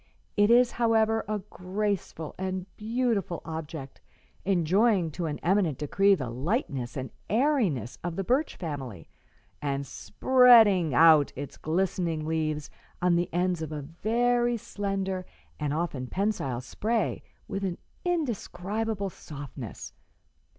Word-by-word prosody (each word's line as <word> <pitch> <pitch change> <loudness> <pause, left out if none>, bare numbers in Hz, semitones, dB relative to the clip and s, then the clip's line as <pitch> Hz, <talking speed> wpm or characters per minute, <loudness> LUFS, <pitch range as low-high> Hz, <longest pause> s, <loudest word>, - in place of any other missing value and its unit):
It 205 0 +4
is, 245 +1 +6
however, 225 -1 +2
a 210 -2 -2
graceful 185 -4 -3
and 185 -1 -2
beautiful 220 -5 -1
object, 160 -3 -7 0.4
enjoying 190 0 +2
to 170 +2 -3
an 150 -1 -3
eminent 180 -6 +2
decree 195 +7 +3
the 130 -9 -4
lightness 135 - -2
and 130 -2 -4 0.2
airiness 215 - +1
of 175 -1 -3
the 195 - -2
birch 260 - +1
family, 135 - -6 0.5
and 140 -1 -2
spreading 215 - +5
out 155 -1 +7
its 140 +1 -6
glistening 170 -1 -1
leaves 155 -2 -2 0.3
on 180 -1 +3
the 175 0 0
ends 180 0 0
of 160 -1 -4
a 150 -2 -4
very 240 - +1
slender 195 -3 -3 0.4
and 150 -2 -1
often 150 -5 -2
pensile 185 - -1
spray 215 - -1 0.3
with 195 - -4
an 185 -2 -2 0.3
indescribable 220 - -2
softness. 140 -8 -8
180 Hz, 120 wpm, -28 LUFS, 155-215 Hz, 0.5 s, out